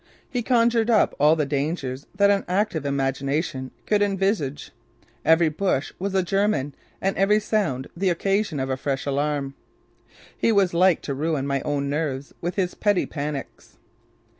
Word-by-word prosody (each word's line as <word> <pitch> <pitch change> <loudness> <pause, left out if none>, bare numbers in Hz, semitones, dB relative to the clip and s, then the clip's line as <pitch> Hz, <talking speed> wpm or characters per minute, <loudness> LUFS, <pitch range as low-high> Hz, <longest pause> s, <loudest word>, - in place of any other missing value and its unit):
He 250 -2 -2
conjured 235 -1 +2
up 220 -3 +4
all 150 +2 +5
the 155 -2 0
dangers 140 -2 -3
that 200 +1 +4
an 200 -1 +1
active 180 -5 0
imagination 135 +1 -1 0.2
could 210 -1 +2
envisage: 195 -8 0 0.5
Every 160 +1 +5
bush 155 -3 -1
was 195 +1 -2
a 190 - +3
German 195 -7 0 0.3
and 195 +1 0
every 200 +3 +4
sound 195 - -1
the 190 +2 +1
occasion 195 -2 0
of 130 0 -2
a 130 - -1
fresh 135 0 -2
alarm. 140 0 -1 0.8
He - - +2
was 195 -4 +3
like 180 0 +3
to 140 - -3
ruin 150 0 -1
my 140 -1 -1
own 140 -1 -1
nerves 140 -2 -3
with 175 +1 -3
his 185 -3 0
petty 205 -3 +1
panics. 145 -2 -6
160 Hz, 160 wpm, -24 LUFS, 140-195 Hz, 0.8 s, all